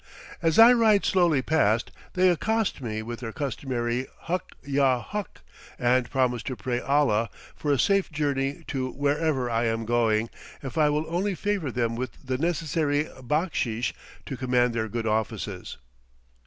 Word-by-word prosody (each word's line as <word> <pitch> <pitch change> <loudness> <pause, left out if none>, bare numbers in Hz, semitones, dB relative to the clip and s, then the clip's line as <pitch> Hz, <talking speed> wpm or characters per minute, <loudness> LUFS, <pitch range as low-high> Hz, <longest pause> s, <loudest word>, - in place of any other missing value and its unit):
As 165 -2 +2
I 230 +2 +9
ride 220 -4 +4
slowly 170 -8 +3
past, 115 -8 +2 0.2
they 185 0 +4
accost 220 +1 0
me 110 -3 -3
with 120 +1 -6
their 115 -2 -5
customary 125 -2 -2
"huk 180 +1 -3
yah 135 -2 +2
huk," 205 - -6 0.4
and 125 0 +2
promise 125 -3 +1
to 130 - -4
pray 120 0 -2
Allah 125 -6 +2 0.3
for 145 - -1
a 140 - +3
safe 195 +5 +2
journey 140 -2 -1
to 130 -3 -2
wherever 145 -1 0
I 115 0 0
am 115 0 -1
going, 115 -1 +1 0.3
if 135 -3 -6
I 150 -2 +4
will 150 +1 0
only 185 +4 -1
favor 200 -6 -1
them 115 -1 -1
with 125 +2 -5
the 130 0 -2
necessary 155 -2 0
backsheesh 130 -4 -1 0.3
to 135 - -5
command 125 -1 +1
their 110 -1 -1
good 115 +1 -3
offices. 110 0 -2
135 Hz, 155 wpm, -26 LUFS, 120-160 Hz, 0.4 s, I